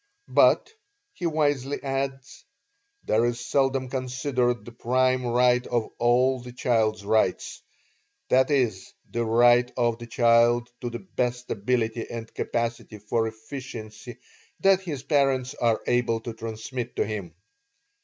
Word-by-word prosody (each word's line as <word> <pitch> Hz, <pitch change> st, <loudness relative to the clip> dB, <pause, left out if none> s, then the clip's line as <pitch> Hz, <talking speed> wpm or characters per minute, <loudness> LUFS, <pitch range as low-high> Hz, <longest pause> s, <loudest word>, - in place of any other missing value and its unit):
But, 445 Hz, -, +4 dB, 0.4 s
he 175 Hz, -, -3 dB
wisely 145 Hz, -3 st, 0 dB
adds, 135 Hz, -1 st, -4 dB, 0.6 s
there 110 Hz, +2 st, +2 dB
is 120 Hz, 0 st, 0 dB
seldom 135 Hz, +1 st, 0 dB
considered 125 Hz, -3 st, -1 dB
the 120 Hz, -, -9 dB
prime 130 Hz, +1 st, +1 dB
right 125 Hz, +1 st, +3 dB
of 120 Hz, -2 st, -1 dB
all 125 Hz, +2 st, +3 dB
the 125 Hz, 0 st, -10 dB
child's 110 Hz, -5 st, 0 dB
rights, 105 Hz, -3 st, 0 dB, 0.7 s
i. 130 Hz, +1 st, +6 dB
e., 130 Hz, -5 st, +3 dB, 0.4 s
the 120 Hz, -, -1 dB
right 120 Hz, +2 st, +4 dB
of 120 Hz, -2 st, +1 dB
the 120 Hz, -, -8 dB
child 120 Hz, +1 st, +3 dB
to 120 Hz, -, -3 dB
the 120 Hz, +10 st, -8 dB
best 125 Hz, 0 st, -1 dB
ability 115 Hz, +1 st, -1 dB
and 115 Hz, -1 st, -7 dB
capacity 115 Hz, -2 st, -3 dB
for 110 Hz, +2 st, -1 dB
efficiency 110 Hz, -1 st, -8 dB, 0.4 s
that 195 Hz, -1 st, +4 dB
his 150 Hz, -8 st, -5 dB
parents 135 Hz, -3 st, +1 dB
are 115 Hz, -2 st, +1 dB
able 120 Hz, -2 st, +1 dB
to 115 Hz, 0 st, -6 dB
transmit 115 Hz, +2 st, -6 dB
to -, -, +1 dB
him. 100 Hz, -6 st, -6 dB
120 Hz, 135 wpm, -25 LUFS, 115-130 Hz, 0.7 s, i